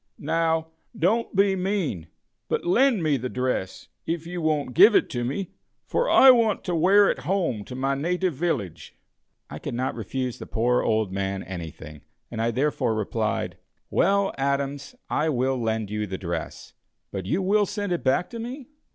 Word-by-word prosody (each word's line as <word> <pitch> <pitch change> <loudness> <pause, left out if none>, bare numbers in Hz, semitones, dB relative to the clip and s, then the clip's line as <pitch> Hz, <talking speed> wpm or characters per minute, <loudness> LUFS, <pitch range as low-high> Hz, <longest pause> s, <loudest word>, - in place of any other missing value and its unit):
"Now, 160 +1 0 0.3
don't 215 +6 +1
be 195 0 +4
mean, 180 - -2 0.4
but - - -1
lend 235 +2 +3
me 150 -3 +2
the 125 +1 -4
dress, 125 -7 -3 0.2
if 165 -1 -2
you 175 0 -5
won't 150 -5 0
give 205 - +7
it - - +3
to 120 -1 -2
me, 155 +10 -3 0.3
for - - 0
I 265 - +8
want 230 -4 +2
to 180 -2 -2
wear 195 +5 +5
it - - 0
home 150 - -1
to 125 - -8
my 135 +1 0
native 175 +5 0
village." 120 - -3 0.5
I - - -8
could - - -5
not 130 +2 -1
refuse 125 +3 -4
the - - -8
poor 120 +2 +1
old 110 -3 0
man 95 0 -2
anything, 80 -4 -8 0.3
and 115 -2 -3
I 115 - +1
therefore 125 -2 0
replied: 110 -2 -2 0.3
"Well, 200 +2 +2
Adams, 140 +1 -2
I 155 +2 0
will 130 -2 0
lend 110 -2 -2
you 105 0 -2
the 95 0 -4
dress; 85 -3 -5 0.4
but 95 -2 -5
you 180 - 0
will 205 +2 +3
send 205 -1 -3
it 175 - -3
back 130 +7 +2
to 230 - -6
me?" 255 +4 -7
140 Hz, 175 wpm, -25 LUFS, 115-185 Hz, 0.5 s, I